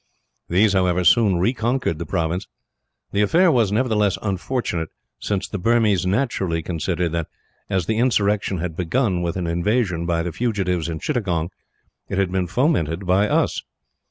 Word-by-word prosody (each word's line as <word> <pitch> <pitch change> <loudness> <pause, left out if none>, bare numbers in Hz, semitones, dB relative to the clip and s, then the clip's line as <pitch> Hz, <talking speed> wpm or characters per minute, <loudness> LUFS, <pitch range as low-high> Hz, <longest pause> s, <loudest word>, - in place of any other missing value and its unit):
These, 100 +4 +3
however, 90 -1 +2
soon 100 -1 +4
reconquered 115 -2 0
the 85 - -5
province. 85 +1 -2 0.6
The 100 - +1
affair 170 - +4
was, 115 -8 +2
nevertheless, 105 -3 +1
unfortunate, 95 -4 -2 0.3
since 100 -2 -2
the 105 - -5
Burmese 105 -3 +2
naturally 95 -6 0
considered 85 +1 -1
that, 85 -1 -2 0.4
as 95 -4 0
the 110 +4 0
insurrection 105 -5 +1
had 85 -1 -4
begun 95 +2 0
with 85 +1 -2
an 90 - -2
invasion 85 0 0
by 85 -1 0
the 85 - -3
fugitives 90 -5 -1
in 80 - -3
Chittagong, 95 - -1 0.6
it 95 - -2
had 95 -2 +1
been 95 -1 0
fomented 95 - 0
by 95 +3 +2
us. - - +1
95 Hz, 155 wpm, -22 LUFS, 85-110 Hz, 0.6 s, soon